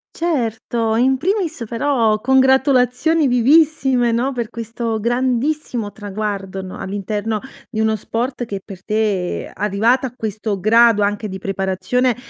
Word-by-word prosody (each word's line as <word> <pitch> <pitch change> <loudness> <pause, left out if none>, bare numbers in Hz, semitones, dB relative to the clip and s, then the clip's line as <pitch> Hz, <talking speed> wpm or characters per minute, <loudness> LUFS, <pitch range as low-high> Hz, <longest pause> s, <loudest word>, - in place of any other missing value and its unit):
Certo! 230 -7 -1
In 260 +3 +3
primis 335 - -1
però 230 -3 +1
congratulazioni 265 +4 +3
vivissime 265 -1 +3
no, 245 +4 0
per 235 -4 -4
questo 230 0 -4
grandissimo 245 0 -1
traguardo, 200 -2 -4
no, 185 - -8
all'interno 205 +2 -3 0.3
di 220 - -4
uno 220 0 +2
sport 240 +4 -3
che 200 -3 -5
per 190 -3 -11
te, 210 -5 -1
ehm, - - -12
arrivata 220 +6 +1
a 240 - -11
questo 215 -2 -3
grado 225 0 +5
anche 205 +1 -1
di 190 - -5
preparazione, 195 +6 0
230 Hz, 130 wpm, -19 LUFS, 210-260 Hz, 0.3 s, grado